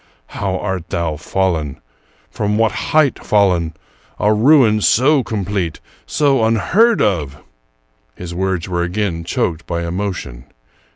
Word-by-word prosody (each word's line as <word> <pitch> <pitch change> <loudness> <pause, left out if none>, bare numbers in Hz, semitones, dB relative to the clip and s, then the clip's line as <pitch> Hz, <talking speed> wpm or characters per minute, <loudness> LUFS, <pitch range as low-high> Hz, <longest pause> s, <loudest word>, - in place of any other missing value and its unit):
how 95 -2 -3
art 95 -3 -4
thou 85 -2 -2
fallen! 80 -2 -2 0.5
From 105 0 -1
what 110 -2 +2
height 140 +6 +1
fallen! 90 -6 +2 0.4
A 105 +1 +3
ruin 115 -2 +4
so 135 +7 +4
complete, 100 -6 -3 0.2
— - - -33
so 140 -5 +3
un 110 +1 +3
heard 220 - +3
of! 75 -9 -1 0.4
" - - -43
His 85 -1 -7
words 95 -1 -2
were 90 -1 -1
again 90 -1 -2
choked 85 -1 -2
by 85 0 -2
emotion. 85 -9 -4
95 Hz, 135 wpm, -18 LUFS, 85-110 Hz, 0.5 s, ruin